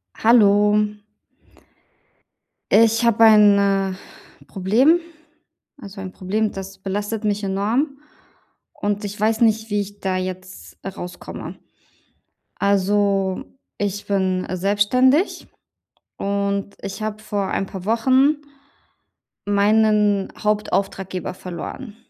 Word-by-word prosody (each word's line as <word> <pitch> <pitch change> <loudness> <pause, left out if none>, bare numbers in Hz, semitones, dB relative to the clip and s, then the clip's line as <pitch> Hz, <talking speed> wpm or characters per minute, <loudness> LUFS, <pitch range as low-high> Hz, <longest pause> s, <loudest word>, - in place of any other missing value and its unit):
Hallo. 210 -2 +4 2.0
Ich 225 +2 +4
habe 230 -1 +4
ein, 210 -2 +7
äh, 195 -1 +1 0.5
Problem. 230 - +3 0.8
Also 200 -6 -10
ein 190 -1 -6
Problem, 205 +4 -2
das 195 0 -8
belastet 205 +3 -3
mich 210 -1 -1
enorm 225 +9 -1 0.7
und 205 +1 -3
ich 205 0 -6
weiß 220 +2 +1
nicht, 220 0 +2
wie 205 -1 0
ich 205 +1 -11
da 190 -1 -1
jetzt 185 0 -7
rauskomme. 180 -2 -8 1.0
Also, 200 -1 +1 0.3
ich 205 0 -3
bin 190 -2 0
selbstständig 205 - +2 0.7
und 200 0 -2
ich 195 - -6
habe 215 0 -4
vor 205 -2 -2
ein 195 - -2
paar 190 -1 -8
Wochen 260 +7 +3 1.1
...meinen 210 -1 +2
Hauptauftraggeber 195 -3 -2
verloren. 185 +6 -8
205 Hz, 100 wpm, -21 LUFS, 195-220 Hz, 2.0 s, ein